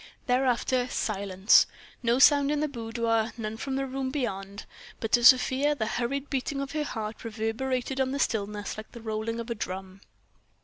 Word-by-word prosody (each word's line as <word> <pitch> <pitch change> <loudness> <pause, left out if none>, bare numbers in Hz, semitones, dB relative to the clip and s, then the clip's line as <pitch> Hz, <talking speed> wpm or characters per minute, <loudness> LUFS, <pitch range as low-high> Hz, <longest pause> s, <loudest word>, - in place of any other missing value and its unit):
Thereafter, 250 -1 +1
silence, 195 -2 +3 0.3
no 235 0 +2
sound 285 +1 +6
in 295 0 +1
the 305 - +1
boudoir, 230 -3 -1
none 215 -1 -4
from 265 +4 -4
the 270 0 -1
room 265 0 -3
beyond. 200 -8 -4 0.3
But 225 - -4
to 240 - +4
Sofia 265 +3 +5
the 220 - -2
hurried 255 +5 -2
beating 275 +1 -2
of 275 -1 -4
her 305 0 -1
heart 220 -5 -5
reverberated 245 +4 -2
on 260 - +1
the 275 - -2
stillness 210 -5 -2
like 215 - -9
the 235 - -9
rolling 220 +1 -3
of 235 +1 -5
a - - +2
drum. 190 -2 -6
235 Hz, 175 wpm, -28 LUFS, 220-270 Hz, 0.3 s, sound